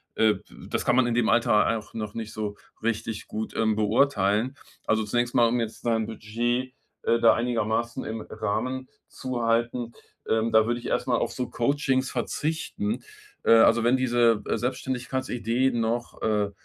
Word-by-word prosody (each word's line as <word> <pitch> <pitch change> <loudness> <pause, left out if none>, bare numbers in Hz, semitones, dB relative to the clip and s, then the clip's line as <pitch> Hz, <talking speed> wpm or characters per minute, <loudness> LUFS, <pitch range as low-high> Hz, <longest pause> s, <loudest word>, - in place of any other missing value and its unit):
äh 110 -1 +4
d 95 - -12 0.3
das - - -2
kann - - +3
man 130 -1 +4
in 120 - 0
dem 120 -2 +2
Alter 115 -1 +3
auch 110 +2 -11
noch 105 -2 -4
nicht 110 -1 -6
so 105 -1 -4 0.3
richtig 110 -1 -2
gut, 110 +1 -5
ähm, 110 -1 +2
beurteilen. 110 +1 +2 0.3
Also, 110 0 +2
zunächst 120 +3 0
mal, 120 -1 +5
um 120 +1 +1
jetzt 115 -1 -4
dein 115 -2 +1
Budget, 120 +4 -2 0.3
äh, 115 - +2
da 115 - +6
einigermaßen 115 -1 -1
im 110 0 -4
Rahmen 125 +5 -2 0.2
zu 130 -2 -4
halten. 115 +1 0 0.4
Ähm, 110 +1 +1
da 110 0 +5
würde 120 0 0
ich - - -7
erstmal - - +1
auf - - -1
so 125 -2 -3
Coachings 135 +1 +1
verzichten. 160 - -2 0.4
Äh, - - +3
also, 115 0 +6
wenn 120 +3 +4
diese, 120 -4 +3
äh, - - 0
Selbstständigkeitsidee 130 -1 -1
noch, 120 0 -2
äh, 105 -2 +1
115 Hz, 170 wpm, -26 LUFS, 110-125 Hz, 0.4 s, da